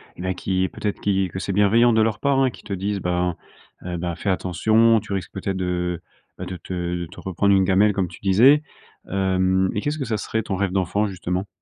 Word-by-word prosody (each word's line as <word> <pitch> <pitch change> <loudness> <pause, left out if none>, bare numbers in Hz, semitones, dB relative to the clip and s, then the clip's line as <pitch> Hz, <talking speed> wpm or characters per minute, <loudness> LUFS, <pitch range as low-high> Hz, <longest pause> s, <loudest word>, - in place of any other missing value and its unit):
mais 95 +1 -3
qui 95 0 -1
peut-être 105 -2 -4
qui 95 -2 +1
que 95 - -6
c'est 95 - -3
bienveillant 110 +4 +4
de 110 -1 +4
leur 110 -1 -1
part 140 -1 +1
hein, 130 -2 +3
qui - - -14
te 105 - -10
disent: 100 +2 -2
«bah 90 -1 0 0.5
heu, 90 -1 -4
bah 85 -1 -3
fais 100 - -3
attention, 110 +5 +3
tu 105 0 -11
risques 95 - -4
peut-être 95 0 -3
de 90 -1 -2 0.3
bah - - -6
de 90 - -6
te 90 - -8
de 85 -1 -3
te 95 - -13
reprendre 100 +2 +1
une 95 - +4
gamelle 100 +2 +3
comme 95 -3 -1
tu - - -13
disais». 120 +10 +5 0.5
Hem 95 -1 +1
et 105 - -2
qu'est-ce 145 +1 -2
que 135 - -3
ça 110 -2 -1
serait 110 +1 -2
ton 95 - -3
rêve 95 -1 -1
d'enfant 95 +3 0
justement? 90 0 -3
95 Hz, 225 wpm, -22 LUFS, 90-105 Hz, 0.5 s, disais